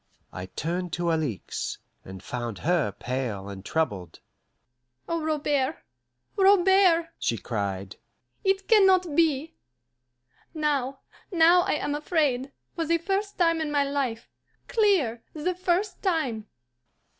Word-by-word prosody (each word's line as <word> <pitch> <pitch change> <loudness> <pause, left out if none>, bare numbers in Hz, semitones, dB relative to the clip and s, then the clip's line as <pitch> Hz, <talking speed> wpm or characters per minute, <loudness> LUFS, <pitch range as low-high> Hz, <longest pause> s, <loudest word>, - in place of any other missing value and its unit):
I 95 0 -6
turned 175 - -3
to 170 0 0
Alixe, 150 - -3 0.3
and 95 0 -10
found 120 -1 -4
her 170 - +2
pale 115 -2 -4
and 100 -1 -8
troubled. 105 - -2 0.9
"Oh, 335 -1 -1
Robert, 295 -3 0 0.6
Robert!" 380 -3 +5
she 115 - 0
cried, 100 -4 -4 0.5
"it 385 0 +1
can 425 -4 +6
not 365 -5 +3
be. 315 -1 +2 1.0
Now, 275 -3 -1 0.3
now 345 0 +6
I - - 0
am 295 -1 -1
afraid, 290 -4 0 0.2
for 335 - -2
the 335 +1 +2
first 390 +4 -2
time 330 -2 +2
in 305 -2 -2
my 290 -1 +3
life, 275 -5 -2 0.4
clear, 370 - +2
the 315 +4 -1
first 365 +3 -1
time!" 270 - -1
290 Hz, 120 wpm, -26 LUFS, -, 1.0 s, can